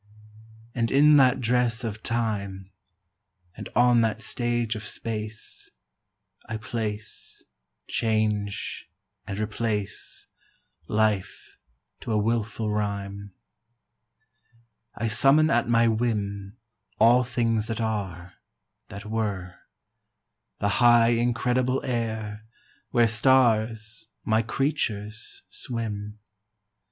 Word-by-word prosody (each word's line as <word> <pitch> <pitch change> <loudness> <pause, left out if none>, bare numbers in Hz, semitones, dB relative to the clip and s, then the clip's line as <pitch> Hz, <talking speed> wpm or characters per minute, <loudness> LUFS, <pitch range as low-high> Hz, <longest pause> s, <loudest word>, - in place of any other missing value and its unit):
And 115 -2 0
in 145 +3 +6
that 130 -2 +4
dress 125 0 +1
of 110 -1 -4
time 100 -5 -2 0.8
And - - -8
on 120 0 +5
that 110 -1 0
stage 120 -2 0
of 110 - -5
space 110 0 -5 0.8
I 110 - -3
place, 110 -1 -5 0.4
change, 105 -3 -1 0.4
and 100 - -4
replace 105 -1 -3 0.6
Life 105 -3 -1 0.4
to - - -5
a 110 - +2
wilful 110 0 -1
rime. 100 -1 -3 1.6
I 115 - -2
summon 135 +8 +4
at 120 0 +2
my 115 0 +4
whim 105 -3 -1 0.4
All 120 +3 +6
things 115 -3 0
that 115 -1 -3
are, 95 -6 -3 0.5
that 100 +2 -9
were: 105 -4 -3 1.0
The 100 - 0
high 120 -1 +6
incredible 125 +2 +1
air, 110 -4 -3 0.5
Where 120 -2 +4
stars 110 -2 +2 0.2
my 110 +1 +3
creatures 110 -4 -3
swim. 105 -3 -5
110 Hz, 95 wpm, -26 LUFS, 105-120 Hz, 1.6 s, in